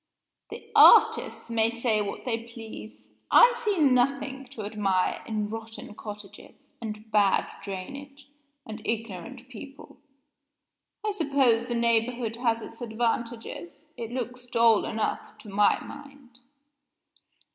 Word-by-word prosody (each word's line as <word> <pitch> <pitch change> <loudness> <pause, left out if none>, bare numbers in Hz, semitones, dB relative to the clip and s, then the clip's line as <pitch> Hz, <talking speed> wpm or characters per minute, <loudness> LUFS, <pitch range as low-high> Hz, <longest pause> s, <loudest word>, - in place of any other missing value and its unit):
"The - - -10
artists - - +6
may 225 -1 +3
say 235 -2 0
what 200 -1 -5
they 230 -2 -2
please; 110 - -10 0.2
I 485 0 +7
see 420 -4 -1
nothing 270 -1 +2
to 245 -4 -9
admire 200 -3 0
in 215 -2 -2
rotten 225 -1 -8
cottages, 210 -1 -11
and 215 -1 -7
bad 205 -2 +3
drainage, 275 +9 -8 0.4
and 220 0 -8
ignorant 225 +2 -5
people. 270 +3 -12 1.1
I 425 - +1
suppose 275 - +2
the 240 -1 -2
neighborhood 235 0 +1
has 230 -2 0
its 230 - -11
advantages. 230 - -3
It 230 -2 -6
looks 245 0 -5
dull 230 -2 +4
enough, 220 -1 -3
to 215 - -13
my 205 +1 +3
mind." 275 -4 -13
230 Hz, 120 wpm, -27 LUFS, 215-255 Hz, 1.1 s, I